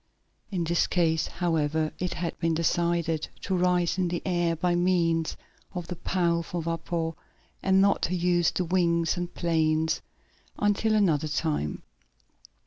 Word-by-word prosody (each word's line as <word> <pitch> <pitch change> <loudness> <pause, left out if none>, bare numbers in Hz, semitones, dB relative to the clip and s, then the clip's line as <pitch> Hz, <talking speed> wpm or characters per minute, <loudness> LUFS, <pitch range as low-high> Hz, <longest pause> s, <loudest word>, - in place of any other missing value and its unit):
In 185 -4 -1
this 170 +1 +1
case, 160 -3 +1
however, 160 -3 0
it 180 0 -2
had 170 -1 -3
been 165 -1 +1
decided 170 -1 0
to 190 - -1
rise 180 0 +2
in 180 - +2
the 175 0 -3
air 175 -2 +1
by 175 +2 0
means 170 -2 +1 0.4
of 175 -1 -3
the 180 - -3
powerful 170 -1 -1
vapor, 165 0 -2 0.5
and 190 0 +4
not 200 0 +3
to 180 - 0
use 175 -1 +2
the 180 - -2
wings 170 -2 +2
and 175 -1 -4
planes 160 -1 +1 0.6
until 205 +2 +2
another 160 -8 +2
time. 150 - -2
170 Hz, 140 wpm, -27 LUFS, 165-180 Hz, 0.6 s, and